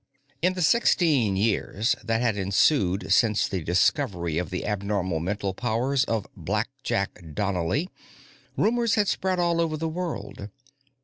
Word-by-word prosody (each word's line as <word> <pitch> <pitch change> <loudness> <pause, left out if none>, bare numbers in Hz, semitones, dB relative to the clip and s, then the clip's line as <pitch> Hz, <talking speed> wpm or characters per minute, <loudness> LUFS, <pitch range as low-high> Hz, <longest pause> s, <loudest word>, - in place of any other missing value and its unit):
In 180 +2 +2
the 180 - -1
sixteen 150 - +3
years 105 +2 0
that 115 +1 0
had 115 -4 +1
ensued 100 - +1
since 110 -3 +3
the 95 -3 -3
discovery 85 - +1
of 90 - -4
the 90 - -4
abnormal 100 -4 -1
mental 100 +3 -2
powers 125 +6 0
of 110 -6 -1
"Blackjack" 80 -4 -3
Donnely, 100 - -1 0.7
rumors 235 0 +2
had 210 -2 +2
spread 190 -1 0
all 170 -1 +1
over 160 -2 -1
the 160 +1 -2
world. 155 - -5
110 Hz, 135 wpm, -25 LUFS, 95-160 Hz, 0.7 s, sixteen